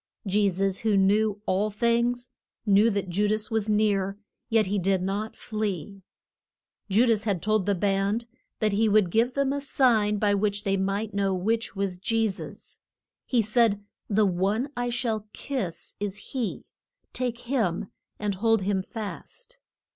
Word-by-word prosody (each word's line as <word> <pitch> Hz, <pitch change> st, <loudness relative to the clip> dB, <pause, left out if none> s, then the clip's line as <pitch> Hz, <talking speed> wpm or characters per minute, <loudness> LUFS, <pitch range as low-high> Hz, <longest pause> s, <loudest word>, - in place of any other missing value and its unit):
Je 200 Hz, +1 st, +3 dB
sus, 195 Hz, +1 st, 0 dB
who 215 Hz, -2 st, +2 dB
knew 205 Hz, +2 st, +3 dB
all 200 Hz, +3 st, +1 dB
things, 235 Hz, +3 st, 0 dB, 0.3 s
knew 205 Hz, +2 st, +5 dB
that 200 Hz, -3 st, -1 dB
Ju 200 Hz, +4 st, +1 dB
das 215 Hz, +1 st, -1 dB
was 220 Hz, -1 st, 0 dB
near, 200 Hz, -2 st, +1 dB, 0.3 s
yet 225 Hz, -2 st, +3 dB
he 200 Hz, +2 st, 0 dB
did 190 Hz, +1 st, +2 dB
not 205 Hz, +3 st, -2 dB
flee. 200 Hz, -3 st, -4 dB, 0.9 s
Ju 215 Hz, +6 st, +4 dB
das 220 Hz, -3 st, +2 dB
had 200 Hz, -5 st, 0 dB
told 215 Hz, 0 st, +1 dB
the 200 Hz, -, +3 dB
band 200 Hz, +4 st, 0 dB, 0.3 s
that 215 Hz, -2 st, +1 dB
he 215 Hz, +2 st, +2 dB
would 205 Hz, -4 st, +3 dB
give 235 Hz, +5 st, +2 dB
them 280 Hz, -1 st, +1 dB
a 285 Hz, -, -2 dB
sign 225 Hz, -7 st, +2 dB
by 205 Hz, 0 st, +2 dB
which 205 Hz, 0 st, 0 dB
they 195 Hz, -2 st, +1 dB
might 195 Hz, +3 st, -1 dB
know 195 Hz, -1 st, +1 dB
which 225 Hz, +5 st, -1 dB
was 195 Hz, -2 st, -2 dB
Je 225 Hz, +3 st, +1 dB
sus. 195 Hz, -1 st, -7 dB, 0.5 s
He 240 Hz, -3 st, +2 dB
said, 215 Hz, -1 st, +2 dB, 0.3 s
The 210 Hz, 0 st, +3 dB
one 200 Hz, +9 st, 0 dB
I 245 Hz, 0 st, -1 dB
shall 230 Hz, -3 st, -2 dB
kiss, 235 Hz, -12 st, -4 dB
is 205 Hz, -1 st, -3 dB
he; 250 Hz, -7 st, -3 dB, 0.5 s
take 245 Hz, -2 st, -2 dB
him, 220 Hz, -9 st, -1 dB, 0.3 s
and 210 Hz, -1 st, -1 dB
hold 225 Hz, +1 st, +2 dB
him 195 Hz, 0 st, +1 dB
fast. 245 Hz, -, -8 dB
210 Hz, 160 wpm, -26 LUFS, 195-225 Hz, 0.9 s, knew